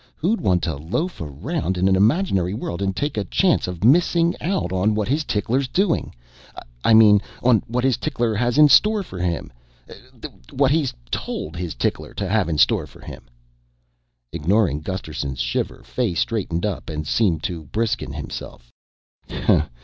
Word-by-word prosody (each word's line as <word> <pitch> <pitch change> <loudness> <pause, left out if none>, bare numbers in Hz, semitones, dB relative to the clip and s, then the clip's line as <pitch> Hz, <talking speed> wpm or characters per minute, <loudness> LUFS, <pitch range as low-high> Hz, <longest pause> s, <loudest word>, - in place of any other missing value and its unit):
"Who'd 205 +8 0
want 90 -2 +1
to 80 -4 -1
loaf 120 - -3
around 95 - -3
in 95 +1 +2
an 95 - +4
imaginary 100 - +2
world 95 -5 -5
and 95 -1 -1
take 145 -4 -2
a 105 - 0
chance 180 - +1
of 90 0 -6
missing 170 +6 +4
out 185 - -1
on 100 +3 +1
what 105 -1 -1
his 150 +4 0
tickler's 125 +3 -1
doing? 185 +5 0 0.7
I 115 - +5
mean, 105 -2 +7 0.2
on 120 -3 +4
what 125 +2 -1
his 130 -2 +2
tickler 120 -5 -1
has 120 +4 0
in 150 0 +8
store 210 +7 +5
for 95 - -9
him 85 -7 -3 1.0
what 140 0 +2
he's 150 -4 +1 0.2
told 80 +2 -4
his 85 -2 -4
tickler - - -3
to 100 - -3
have 100 -2 +1
in 80 - -1
store - - +3
for - - -17
him." - - -10 1.1
Ignoring 85 -1 +1
Gusterson's 75 -7 -5
shiver, - - -2
Fay 115 -9 -2
straightened 90 -2 -1
up 100 -4 -4
and 75 -1 -4
seemed 85 -3 +1
to 85 -5 -4
brisken 110 +9 -2
himself. - - -8
105 Hz, 165 wpm, -22 LUFS, 85-130 Hz, 1.1 s, in